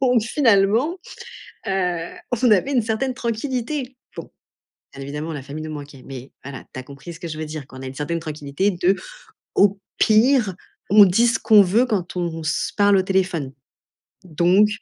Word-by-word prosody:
Donc 250 -4 +3
finalement, 230 - +2 0.7
heu, 180 -3 -1 0.3
on 245 -4 +4
avait 210 +8 +3
une 245 - +3
certaine 225 +4 -1
tranquillité, 250 +3 -3 0.2
bon. - - -8 0.6
Bien 135 - -9
évidemment 150 +3 -5
la 145 - -5
famille 145 +3 -7
nous 155 - -6
manquait, 145 -3 -10
mais 130 -1 -9
voilà, 135 -2 -8
tu 130 - -6
as - - -8
compris 140 +5 -10
ce 165 - -13
que 170 - -6
je 155 -1 -6
veux 155 - -4
dire. 150 -3 -7
Qu'on 130 0 -11
a - - -7
une 130 - -7
certaine 165 +4 -2
tranquillité 155 +4 -2
de 180 +2 +2 0.6
au 200 0 +3 0.2
pire, 220 -3 +4 0.3
on 205 0 +8
dit 225 +6 +3
ce 230 -1 +2
qu'on 215 -2 +6
veut, 205 +7 +3
quand 190 -8 -2
on 170 -2 -3
se 155 - -1
parle 205 -1 +4
au 190 - +4
téléphone. 180 -7 -1 0.7
Donc, 180 +5 +3
190 Hz, 180 wpm, -21 LUFS, 155-225 Hz, 0.7 s, on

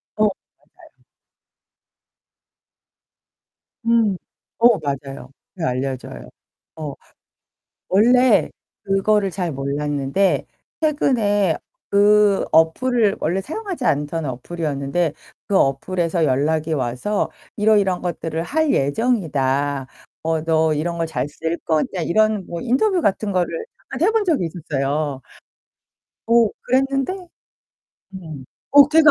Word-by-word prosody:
어. 215 - +1 0.6
맞아요. - - -25 2.8
음. 230 -4 +3 0.4
어 235 -1 +5
맞아요. 140 -3 -5 0.3
그렇게 170 -6 -1
알려줘요. 130 0 -4 0.5
어, 155 -3 -5 1.0
원래 245 +4 +4 0.3
그거를 195 +1 +1
잘 175 -3 -3
몰랐는데 140 +5 0 0.3
최근에 215 - +2 0.3
그 205 0 +4
어플을 205 +7 +3
원래 175 +5 0
사용하지 350 - -5
않던 150 -1 0
어플이었는데 145 +3 -2 0.3
그 200 - +1
어플에서 165 +4 +1
연락이 155 +3 +1
와서 130 - -1 0.3
"이러이러한 205 -4 +2
것들을 165 -2 -3
할 310 - +1
예정이다. 145 - 0 0.4
어 160 -1 +1
너 160 -1 +2
이런 170 +3 -2
거 165 - 0
잘 160 -3 -3
쓸 160 +3 -3
거냐?" 165 +3 0
이런 215 +2 +2
뭐 170 -1 -5
인터뷰 355 - +1
같은 205 - 0
거를 185 - -1 0.3
한 - - -5
해 380 - +5
본 445 -1 +1
적이 315 - +1
있었어요. 145 -3 -2 1.1
오, 230 -2 +4
그랬는데. 270 +5 +1 1.0
음. 160 -7 -8 0.3
어, 280 0 +8
걔가 310 0 +6
175 Hz, 225 characters per minute, -21 LUFS, 150-220 Hz, 2.8 s, 어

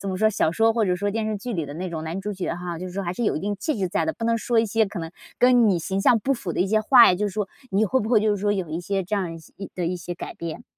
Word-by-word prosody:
怎 200 - -5
么 185 - -2
说， 215 +2 +3
小 175 - +1
说 225 +4 +3
或 225 -2 +1
者 180 - +2
说 205 +2 -1
电 220 +1 -2
视 215 -1 -1
剧 240 +5 -5
里 165 -7 -2
的 145 - -8
那 180 +2 -4
种 160 -2 -4
男主角 190 +2 -3
哈， 175 -2 -5
就 185 - -5
是 180 - -8
说 200 - -3
还 175 -1 -3
是 235 +5 -3
有 - - +1
一 - - -3
定 205 +1 -2
气 310 - -1
质 185 - 0
在 205 +3 0
的， 320 - 0
不 230 - -6
能 230 0 +2
说 235 +1 +1
一 225 - +4
些 220 +1 +2
可 195 -2 -7
能 165 -1 -5 0.3
跟 245 -3 +5
你 180 -3 +2
形 190 +4 -2
象 225 +3 +5
不 265 +6 0
符 190 -7 -5
的 - - -2
一 190 - +3
些 215 +2 +2
话 240 +2 +7
呀， - - +4
就 210 +3 -1
是 200 - -4
说 205 -1 -2 0.2
你 200 +3 +2
会 260 +6 +1
不 215 - -3
会 225 -3 +4
就 215 0 +2
是 205 - +1
说 205 0 +2
有 190 -5 -2
一 160 +3 -3
些 195 +2 -1
这 200 +4 -2
样 175 -4 -2 0.2
一 195 - -8
的 175 -2 -2
一 180 - -1
些 175 0 -6
改 - - -7
变？ 165 -2 -6
200 Hz, 390 characters per minute, -24 LUFS, 180-220 Hz, 0.3 s, 话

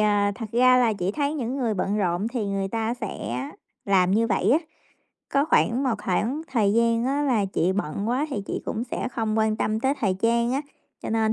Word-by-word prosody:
à, 205 -1 +2
thật 225 +2 -6
ra 255 +2 +5
là 240 -3 +3
chị 190 -2 -2
thấy 290 +2 -1
những 255 -3 -3
người 240 -5 0
bận 200 +2 -1
rộn 180 0 0
thì 235 -4 -3
người 195 -1 -2
ta 225 +2 -1
sẽ 230 -5 -5 0.7
làm 185 -2 +3
như 220 +4 +3
vậy 205 -2 +1
á. 295 - +5 0.7
Có 280 +1 +3
khoảng 260 -5 +2
một 255 -4 +1
khoảng 235 - 0
thời 210 -5 +3
gian 230 +1 +2
á 280 +3 0
là 245 -8 +2
chị 185 -1 0
bận 200 +2 -2
quá 260 +5 0
thì 205 -7 -3
chị - - -4
cũng 225 +2 -3
sẽ 250 - -3
không 225 -3 -1
quan 220 0 +2
tâm 215 0 -1
tới 265 +3 +1
thời 195 -4 +1
trang 235 +4 +1
á, 270 - 0 0.4
cho - - -4
nên 220 0 +2
225 Hz, 225 wpm, -25 LUFS, 205-250 Hz, 0.7 s, ra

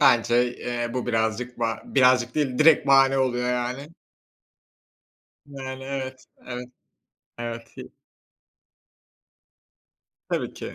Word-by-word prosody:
Bence, 120 -2 +4
eee, 120 -1 -3
bu 125 - -2
birazcık 115 +1 -1
ba 115 -1 -2
birazcık 125 -2 +3
değil, 135 -5 0
direkt 155 0 +6
bahane 135 0 +5
oluyor 125 -2 0
yani. 125 +3 -3 1.6
Yani, 135 -2 -7
evet, 130 -1 -5 0.2
evet, 125 0 -6 0.7
evet, 115 -1 -7
hi - - -9 2.4
Tabii - - -2
ki. - - -7
125 Hz, 100 wpm, -25 LUFS, 120-135 Hz, 2.4 s, direkt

